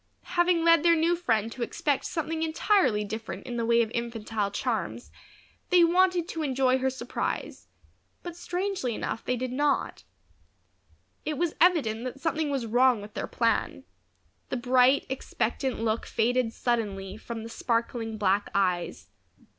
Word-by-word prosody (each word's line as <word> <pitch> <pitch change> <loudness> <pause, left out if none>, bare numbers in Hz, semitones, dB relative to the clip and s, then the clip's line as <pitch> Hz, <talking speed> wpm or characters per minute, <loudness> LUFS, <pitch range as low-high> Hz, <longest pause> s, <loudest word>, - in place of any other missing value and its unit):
Having 350 -1 +3
led 335 -2 +6
their 335 +1 +5
new 330 +2 +2
friend 225 -10 0
to 250 - -8
expect 280 +3 -1
something 320 0 -3
entirely 315 - +2
different 220 +2 -6
in 245 - -5
the 230 - 0
way 235 0 +4
of 220 - -6
infantile 225 -3 -2
charms, 200 - -3 0.6
they 360 -2 +6
wanted 355 0 +3
to 325 - -4
enjoy 260 -2 +2
her 265 0 +1
surprise; 255 -1 -4 0.6
but 350 -1 -6
strangely 355 - -2
enough 225 - -4
they 250 - 0
did 250 +1 -3
not. 285 - 0 1.2
It 305 -2 -3
was 345 0 0
evident 280 -11 +3
that 255 +2 -5
something 315 0 -1
was 270 -4 -1
wrong 245 +1 +4
with 205 +1 -10
their - - -4
plan. 220 - 0 0.7
The 255 - -2
bright, 250 +2 +4
expectant 260 -1 -2
look 225 0 -1
faded 240 +1 +1
suddenly 205 -6 -2
from 225 +1 -7
the 225 - -7
sparkling 230 -1 -2
black 200 0 +1
eyes. 180 -3 0
250 Hz, 150 wpm, -27 LUFS, 225-320 Hz, 1.2 s, led